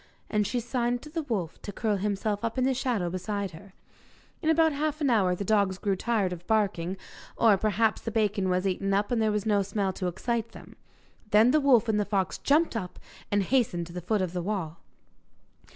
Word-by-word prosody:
And 210 Hz, -2 st, +1 dB
she 245 Hz, -, -1 dB
signed 240 Hz, 0 st, -1 dB
to 300 Hz, -, -11 dB
the 325 Hz, +1 st, -2 dB
wolf 205 Hz, -, -4 dB
to 205 Hz, -, -6 dB
curl 210 Hz, 0 st, -1 dB
himself 205 Hz, +1 st, -2 dB
up 230 Hz, +2 st, -2 dB
in 255 Hz, -, +2 dB
the 265 Hz, +1 st, +2 dB
shadow 245 Hz, -8 st, -1 dB
beside 195 Hz, +1 st, -3 dB
her. 185 Hz, +4 st, -13 dB, 0.7 s
In 320 Hz, -, 0 dB
about 320 Hz, 0 st, +4 dB
half 305 Hz, +1 st, -2 dB
an 285 Hz, -4 st, +2 dB
hour 190 Hz, -6 st, +3 dB
the 200 Hz, -, -4 dB
dogs 200 Hz, -3 st, +2 dB
grew 195 Hz, 0 st, 0 dB
tired 205 Hz, -3 st, 0 dB
of 175 Hz, 0 st, -10 dB
barking, 195 Hz, -4 st, 0 dB, 0.4 s
or 225 Hz, -3 st, +5 dB
perhaps 215 Hz, +2 st, +1 dB
the -, -, -4 dB
bacon 205 Hz, -3 st, 0 dB
was 180 Hz, +1 st, 0 dB
eaten 195 Hz, +1 st, 0 dB
up 205 Hz, +3 st, 0 dB
and 235 Hz, -2 st, +1 dB
there 215 Hz, -1 st, +2 dB
was 210 Hz, 0 st, -1 dB
no 205 Hz, -2 st, +3 dB
smell 195 Hz, 0 st, -1 dB
to 185 Hz, -, -3 dB
excite 230 Hz, +5 st, -2 dB
them. -, -, -13 dB, 0.5 s
Then 220 Hz, +4 st, +5 dB
the 305 Hz, +1 st, +3 dB
wolf 245 Hz, -5 st, +4 dB
and 215 Hz, -1 st, +1 dB
the 205 Hz, -, +1 dB
fox 195 Hz, -2 st, -1 dB
jumped 300 Hz, 0 st, +2 dB
up, 185 Hz, -5 st, -4 dB, 0.3 s
and 205 Hz, -1 st, +2 dB
hastened 205 Hz, -7 st, +1 dB
to 170 Hz, -, -12 dB
the 180 Hz, -, -5 dB
foot 200 Hz, +3 st, 0 dB
of 180 Hz, -2 st, -3 dB
the 180 Hz, -, -2 dB
wall. 170 Hz, -4 st, -3 dB
210 Hz, 215 wpm, -28 LUFS, 190-235 Hz, 0.7 s, or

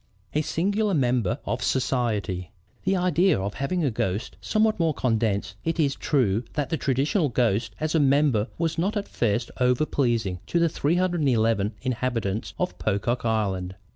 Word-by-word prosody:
A 150 Hz, -, +2 dB
SINGULAR 200 Hz, +6 st, 0 dB
MEMBER 125 Hz, -, +1 dB
OF -, -, -2 dB
SOCIETY 110 Hz, -9 st, -1 dB, 0.4 s
"The 190 Hz, +1 st, +2 dB
idea, 180 Hz, -, +3 dB
of 100 Hz, +1 st, -3 dB
having 170 Hz, +6 st, -1 dB
a 140 Hz, -, +1 dB
ghost 105 Hz, +1 st, -2 dB
somewhat 215 Hz, -1 st, +1 dB
more 165 Hz, -3 st, +1 dB
condensed 110 Hz, -5 st, 0 dB
it 165 Hz, +1 st, -1 dB
is 140 Hz, -3 st, +3 dB
true 120 Hz, -8 st, +1 dB
than 145 Hz, -3 st, -2 dB
the -, -, +2 dB
traditional 140 Hz, -, +1 dB
ghost 115 Hz, -2 st, 0 dB
as 155 Hz, 0 st, -1 dB
a 165 Hz, -, +3 dB
member 140 Hz, -6 st, +3 dB
was 165 Hz, -1 st, -1 dB
not 200 Hz, +5 st, 0 dB
at 200 Hz, -, -3 dB
first 115 Hz, 0 st, -1 dB
overpleasing 125 Hz, -7 st, +1 dB
to -, -, 0 dB
the 170 Hz, 0 st, +3 dB
311 140 Hz, -, +1 dB
inhabitants 115 Hz, -5 st, -2 dB
of 180 Hz, -, -2 dB
Pocock 115 Hz, +4 st, -1 dB
Island. 95 Hz, -5 st, -1 dB
130 Hz, 155 wpm, -25 LUFS, 110-160 Hz, 0.4 s, idea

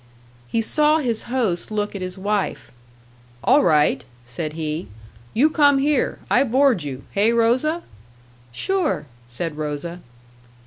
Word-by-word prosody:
He 225 Hz, -, 0 dB
saw 300 Hz, +6 st, +4 dB
his 240 Hz, -7 st, -1 dB
host 225 Hz, -9 st, -1 dB
look 210 Hz, -1 st, -2 dB
at 195 Hz, -, -5 dB
his 185 Hz, +1 st, -5 dB
wife. 200 Hz, +1 st, -2 dB, 0.7 s
"All 275 Hz, +3 st, +5 dB
right," 150 Hz, -4 st, +3 dB, 0.2 s
said 150 Hz, +5 st, -5 dB
he. 155 Hz, +1 st, -4 dB, 0.5 s
"You 265 Hz, +7 st, +5 dB
come 285 Hz, -3 st, +4 dB
here. 285 Hz, 0 st, +1 dB
I 255 Hz, -, +4 dB
board 260 Hz, -4 st, +3 dB
you. 135 Hz, -3 st, -6 dB
Hey, 210 Hz, +3 st, +3 dB
Rosa?" 250 Hz, +9 st, +1 dB, 0.7 s
"Sure," 370 Hz, -, -1 dB, 0.2 s
said 150 Hz, +6 st, -4 dB
Rosa. 155 Hz, +3 st, -4 dB
215 Hz, 130 wpm, -22 LUFS, 160-275 Hz, 0.7 s, All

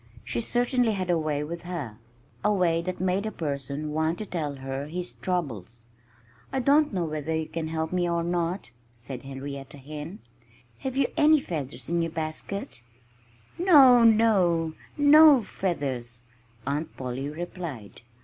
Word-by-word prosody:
She 120 Hz, -, -2 dB
certainly 245 Hz, -, +1 dB
had 185 Hz, -3 st, -1 dB
a 170 Hz, -, +2 dB
way 150 Hz, -2 st, -1 dB
with 170 Hz, +3 st, -6 dB
her 150 Hz, -12 st, -6 dB, 0.4 s
a 210 Hz, -, +3 dB
way 175 Hz, -4 st, +2 dB
that 185 Hz, +1 st, -4 dB
made 185 Hz, +3 st, 0 dB
a -, -, -3 dB
person 145 Hz, -1 st, -4 dB
want 160 Hz, +2 st, 0 dB
to 215 Hz, -, -5 dB
tell 155 Hz, -7 st, -3 dB
her 135 Hz, +1 st, -5 dB
his 180 Hz, +3 st, -5 dB
troubles. 120 Hz, -, -4 dB, 0.7 s
"I 265 Hz, -, 0 dB
don't 290 Hz, +4 st, +4 dB
know 180 Hz, -4 st, -1 dB
whether 155 Hz, 0 st, -3 dB
you 160 Hz, -1 st, -2 dB
can 165 Hz, -1 st, -4 dB
help 160 Hz, +1 st, -3 dB
me 175 Hz, -1 st, +1 dB
or 170 Hz, 0 st, 0 dB
not," 175 Hz, 0 st, -2 dB, 0.3 s
said 125 Hz, +2 st, -8 dB
Henrietta 135 Hz, +1 st, -7 dB
Hen. 150 Hz, +6 st, -8 dB, 0.6 s
"Have 265 Hz, -1 st, -4 dB
you 275 Hz, -, +4 dB
any 305 Hz, 0 st, +6 dB
feathers 150 Hz, -, -5 dB
in 170 Hz, +1 st, +1 dB
your 165 Hz, -, -1 dB
basket?" 160 Hz, -1 st, -4 dB, 0.8 s
"No 275 Hz, -9 st, +7 dB
no! 190 Hz, -8 st, +4 dB, 0.2 s
No 290 Hz, -2 st, +7 dB
feathers!" 130 Hz, -, -3 dB, 0.4 s
Aunt 145 Hz, +3 st, -3 dB
Polly 130 Hz, +2 st, -4 dB
replied. 160 Hz, -, -7 dB
165 Hz, 150 wpm, -27 LUFS, 145-195 Hz, 0.8 s, No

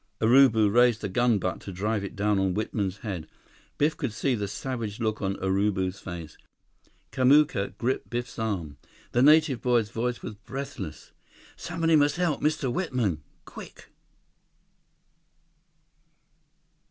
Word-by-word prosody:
Urubu 115 Hz, -2 st, +5 dB
raised 120 Hz, -1 st, +4 dB
the 100 Hz, -, -3 dB
gun 120 Hz, +3 st, +2 dB
butt 90 Hz, -2 st, -2 dB
to 100 Hz, -, -8 dB
drive 105 Hz, +3 st, -2 dB
it 100 Hz, -, -6 dB
down 105 Hz, 0 st, +1 dB
on 95 Hz, -2 st, 0 dB
Whitman's 105 Hz, -3 st, -2 dB
head. 90 Hz, -7 st, -4 dB, 0.5 s
Biff 150 Hz, +2 st, +2 dB
could 135 Hz, -8 st, -3 dB
see 135 Hz, +3 st, 0 dB
the 105 Hz, -4 st, -2 dB
savage 115 Hz, -1 st, -5 dB
look 110 Hz, -2 st, -1 dB
on 95 Hz, -1 st, -1 dB
Urubu's 95 Hz, 0 st, 0 dB
face. 85 Hz, -5 st, -8 dB, 0.7 s
Kamuka 130 Hz, -5 st, +3 dB
gripped 125 Hz, +2 st, -2 dB
Biff's 120 Hz, 0 st, -4 dB
arm. 90 Hz, -10 st, -3 dB, 0.3 s
The 120 Hz, -, +2 dB
native 150 Hz, -3 st, +5 dB
boy's 120 Hz, -4 st, +1 dB
voice 120 Hz, +1 st, -3 dB
was 110 Hz, -, -5 dB
breathless: 135 Hz, +7 st, -7 dB, 0.4 s
"Somebody 165 Hz, -1 st, 0 dB
must 145 Hz, -1 st, +3 dB
help 175 Hz, -5 st, 0 dB
Mr. 145 Hz, -4 st, 0 dB
Whitman! 125 Hz, -, -1 dB, 0.2 s
Quick!" -, -, -12 dB
110 Hz, 130 wpm, -27 LUFS, 100-130 Hz, 0.7 s, Urubu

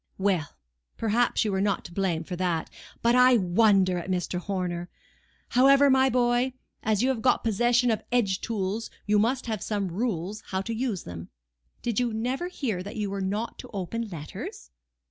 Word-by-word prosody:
"Well! 190 Hz, -6 st, +1 dB, 0.5 s
perhaps 230 Hz, +1 st, +1 dB
you 210 Hz, -, 0 dB
were 190 Hz, 0 st, 0 dB
not 200 Hz, -2 st, 0 dB
to 175 Hz, -, -9 dB
blame 175 Hz, -4 st, 0 dB
for 180 Hz, -, -5 dB
that. 175 Hz, -3 st, -1 dB, 0.3 s
But 235 Hz, +1 st, +4 dB
I 250 Hz, 0 st, +6 dB
wonder 190 Hz, -1 st, +3 dB
at 175 Hz, -, -7 dB
Mr. 180 Hz, -1 st, -1 dB
Horner. 180 Hz, -2 st, -3 dB, 0.6 s
However, 275 Hz, +2 st, +6 dB
my 265 Hz, 0 st, +5 dB
boy, 245 Hz, +1 st, +2 dB, 0.3 s
as 215 Hz, 0 st, +1 dB
you 260 Hz, -, +3 dB
have 255 Hz, -4 st, -1 dB
got 255 Hz, -, +3 dB
possession 240 Hz, +2 st, +3 dB
of 220 Hz, -, -1 dB
edge 205 Hz, -6 st, +1 dB
tools, 210 Hz, 0 st, -2 dB, 0.2 s
you 210 Hz, 0 st, +3 dB
must 240 Hz, +5 st, +1 dB
have 220 Hz, -4 st, -3 dB
some 200 Hz, -3 st, -2 dB
rules 200 Hz, 0 st, -2 dB
how 190 Hz, 0 st, -1 dB
to 230 Hz, +4 st, -4 dB
use 225 Hz, -5 st, -2 dB
them. 85 Hz, -1 st, -8 dB, 0.5 s
Did 235 Hz, -2 st, 0 dB
you 240 Hz, -2 st, 0 dB
never 255 Hz, +9 st, -1 dB
hear 240 Hz, -, -3 dB
that 200 Hz, +2 st, -7 dB
you 205 Hz, -2 st, -2 dB
were 200 Hz, 0 st, -3 dB
not 205 Hz, +5 st, -3 dB
to -, -, -9 dB
open 225 Hz, +5 st, -3 dB
letters?" 150 Hz, -, -8 dB
210 Hz, 185 wpm, -27 LUFS, 185-240 Hz, 0.6 s, I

